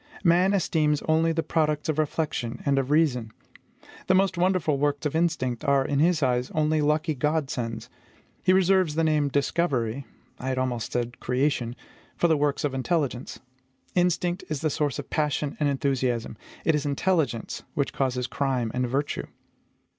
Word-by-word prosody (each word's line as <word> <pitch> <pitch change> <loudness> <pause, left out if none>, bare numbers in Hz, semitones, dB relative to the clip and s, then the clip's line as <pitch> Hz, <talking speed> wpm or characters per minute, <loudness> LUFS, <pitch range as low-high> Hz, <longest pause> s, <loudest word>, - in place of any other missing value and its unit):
Man 180 +2 +4
esteems 150 -5 +1
only 160 +1 +2
the 165 0 -1
products 150 -2 0
of 155 -1 0
reflection 140 -6 -2
and 140 -1 +3
of 135 0 -2
reason. 140 -8 +2 0.8
The 185 - +4
most 190 0 +3
wonderful 175 -5 +1
works 145 0 0
of 150 - -1
instinct 155 -8 0
are, 140 -1 +3
in 140 0 0
his 165 0 +3
eyes, 125 -1 +1
only 155 0 +2
lucky 155 +2 +1
GOD 150 +1 0
SENDS; 115 -2 -4 0.5
he 185 - +3
reserves 185 -3 +3
the 165 - +1
name 155 -2 +2
DISCOVERY 140 -3 0 0.3
I 130 - -5
had 130 - -1
almost 125 -3 -2
said 120 0 -3
creation 125 -2 0 0.4
for 175 - +3
the 160 - +4
works 145 -1 0
of 145 -2 0
intelligence. 135 -2 -2 0.5
Instinct 180 0 +1
is 155 -3 -3
the 155 - 0
source 145 -2 -1
of 145 - -7
passion 150 -1 0
and 150 -2 +2
enthusiasm; 130 -5 -1 0.3
it 160 - +4
is 150 -1 0
intelligence 145 - 0
which 140 - -1
causes 125 -2 -1
crime 130 -4 -1
and 125 0 0
virtue. 140 +3 -2
145 Hz, 165 wpm, -26 LUFS, 130-160 Hz, 0.8 s, Man